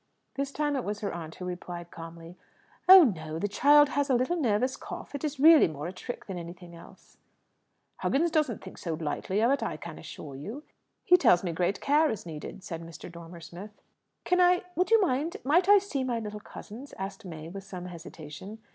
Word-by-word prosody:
This 275 0 -3
time 295 0 -1
it 260 - -1
was 210 +1 -4
her 200 - -2
aunt 165 -2 -7
who 180 - -7
replied 175 -1 -6
calmly, 165 +1 -10 0.5
"Oh 380 -1 +12
no. 160 - -1
The 205 - -1
child 290 +7 +5
has 285 0 0
a 260 - +4
little 255 +8 +1
nervous 255 -4 +1
cough; - - -8
it 285 - -5
is 295 -3 -3
really 315 +1 +8
more 150 -2 -6
a 175 - -5
trick 240 +6 -7
than 190 -3 -5
anything 175 +1 -10
else." 170 - -16 0.8
"Huggins 325 +5 +1
doesn't 305 -9 0
think - - -10
so 165 -3 -3
lightly 165 +6 -2
of 235 +3 +4
it, 280 - +1
I - - -3
can - - -9
assure 140 -3 -9
you. 215 - -7 0.4
He 360 - +6
tells 180 - +4
me 175 - -1
great 180 +3 -1
care 300 +2 +3
is 215 -3 -4
needed," 165 +3 -8
said 170 -5 -6
Mr. 165 +1 -10
Dormer 170 0 -11
Smith. 180 +6 -10 0.4
"Can 360 0 +2
I 360 0 +4
would 365 - +1
you 455 0 +6
mind 315 -2 0
might 345 +8 +3
I 410 - +9
see 380 -9 -2
my 245 -2 -1
little 210 -1 -6
cousins?" 230 +5 -10
asked 195 +2 -6
May, 160 -4 -8
with 195 +3 -8
some 185 -2 -8
hesitation. 170 +2 -9
205 Hz, 210 wpm, -28 LUFS, 170-285 Hz, 0.8 s, Oh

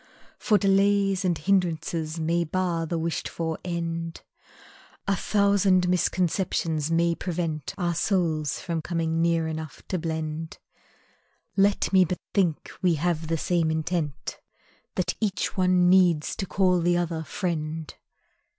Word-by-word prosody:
For 210 - +3
delays 195 -1 +3
And 175 -3 +1
hindrances 165 -3 0
may 170 +2 +1
bar 170 0 -1
the 170 - -2
wished 165 0 -2
for 160 -1 -3
end; 165 -1 -4 0.8
A 195 - +2
thousand 200 -2 +3
misconceptions 170 -3 0
may 170 +1 +2
prevent 165 -5 -3
Our 175 -3 0
souls 165 -5 0
from 170 -3 -3
coming 165 -1 -1
near 165 -1 +2
enough 160 -2 -6
to 185 - -1
blend; 160 0 -4 1.0
Let 200 0 +2
me 190 -1 +7
but 180 +1 -2 0.2
think 175 -6 0
we 180 -3 +3
have 165 0 -1
the 165 +1 0
same 170 0 +1
intent, 160 -2 -2 0.6
That - - 0
each 205 -3 -1
one 180 -2 +3
needs 180 -4 +4
to 190 - -3
call 180 -1 +2
the 175 +1 +2
other, 165 -2 -2
"friend!" 160 -4 -3
170 Hz, 130 wpm, -26 LUFS, 160-185 Hz, 1.0 s, me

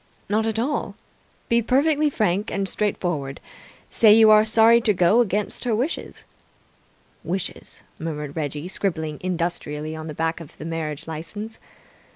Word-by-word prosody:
"Not 220 +2 +1
at 220 -1 -1
all. 270 +6 -2 0.5
Be 235 0 +3
perfectly 290 +5 +2
frank 210 -5 0
and 195 0 -1
straightforward. 175 -10 -2 0.5
Say 220 -2 +6
you 220 -1 +7
are 215 0 +7
sorry 225 +2 +5
to 220 -2 +3
go 180 +5 +4
against 210 -3 0
her 240 -3 +1
wishes 260 +9 -4 0.5
" - - -36
"Wishes," 190 -1 -5 0.2
murmured 150 -3 -5
Reggie, 150 0 -3
scribbling 160 -6 -3
industrially 165 -4 -3
on 160 0 -7
the 155 - -6
back 165 +1 -1
of 155 - -13
the 155 - -8
marriage 160 -3 -4
licence. 205 +8 -7
190 Hz, 150 wpm, -23 LUFS, 160-220 Hz, 0.5 s, you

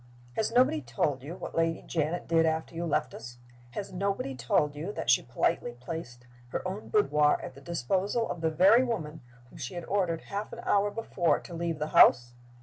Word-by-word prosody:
"Has 220 - -1
nobody 245 -10 +3
told 125 +2 -1
you 150 +6 -7
what - - -7
Lady 165 -1 0
Janet 160 +1 -2
did 165 0 +4
after 160 0 -1
you 170 +1 -3
left 130 -5 0
us? 120 +1 -9 0.4
Has 195 +3 -5
nobody 195 -7 -2
told 130 +4 +1
you 160 +7 -4
that - - 0
she - - +5
politely 485 -1 -1
placed 125 -8 -7 0.2
her 185 - -3
own 195 +3 -6
boudoir 150 - +3
at - - -7
the 140 - -14
disposal 185 - -1
of 175 - -5
the 160 - +2
very 195 +10 +5
woman 160 -11 -3 0.3
whom - - -13
she 125 - -5
had 175 -1 -5
ordered 180 -5 0
half 205 +2 -5
an 235 - -7
hour 205 0 +2
before 200 -5 0
to 175 - -11
leave 165 -1 -2
the 150 0 -3
house? 120 -1 +6
165 Hz, 200 wpm, -29 LUFS, 150-200 Hz, 0.4 s, house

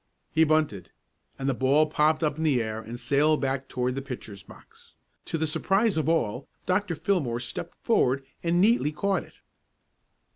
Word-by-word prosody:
He 160 - +5
"bunted," 150 - 0 0.5
and 135 - -3
the 135 - +2
ball 135 +5 +3
popped 155 +1 +2
up 150 -2 +1
in - - -1
the 145 -6 +3
air 110 -1 -3
and 115 +2 -8
sailed 145 +5 +2
back 135 -1 -2
toward 125 0 -1
the 135 - -3
pitcher's 120 -7 -8
box. - - -18 0.3
To - - -2
the 160 - 0
surprise 195 +7 +1
of 160 0 0
all, 130 -6 0 0.2
Dr. 185 -1 0
Fillmore 155 -8 0
stepped 120 - -6
forward 135 +2 +2 0.2
and 170 +1 +1
neatly 210 -5 +3
caught 195 +4 0
it. - - -18
150 Hz, 175 wpm, -27 LUFS, 125-160 Hz, 0.5 s, He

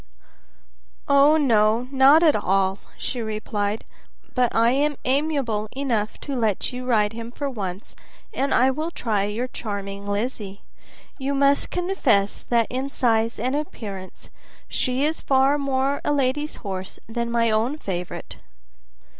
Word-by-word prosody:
"Oh, 280 +2 +6
no, 230 -4 +3
not 275 +4 +6
at 310 -3 +5
all," 195 -1 +1 0.2
she 245 - -4
replied, 215 -1 -2 0.5
"but 250 -2 +2
I 230 +1 +4
am 290 +3 +1
amiable 260 -6 0
enough 235 -6 -1
to 280 - -4
let 220 -2 0
you 250 0 -5
ride 215 -3 +2
him 230 +1 -7
for 285 +3 -4
once, 200 -6 -5 0.4
and 275 +1 -1
I 260 +2 +4
will 310 +5 -3
try 215 -11 -1
your 220 +5 -2
charming 200 -4 -5
Lizzie. 205 -1 -3 0.6
You 275 +1 -1
must 280 0 +3
confess 285 - +1
that 235 -1 +3
in 260 +2 -2
size 230 -4 +1
and 255 +5 0
appearance 200 -10 -6 0.4
she 255 +2 0
is 315 +1 -1
far 270 +2 +3
more 275 0 +1
like - - -5
a 295 - +2
lady's 285 +2 0
horse 190 -1 -5
than 235 +1 -3
my 230 -1 +2
own 230 +7 +1
favorite." 180 - -5
245 Hz, 145 wpm, -23 LUFS, 210-275 Hz, 0.6 s, Oh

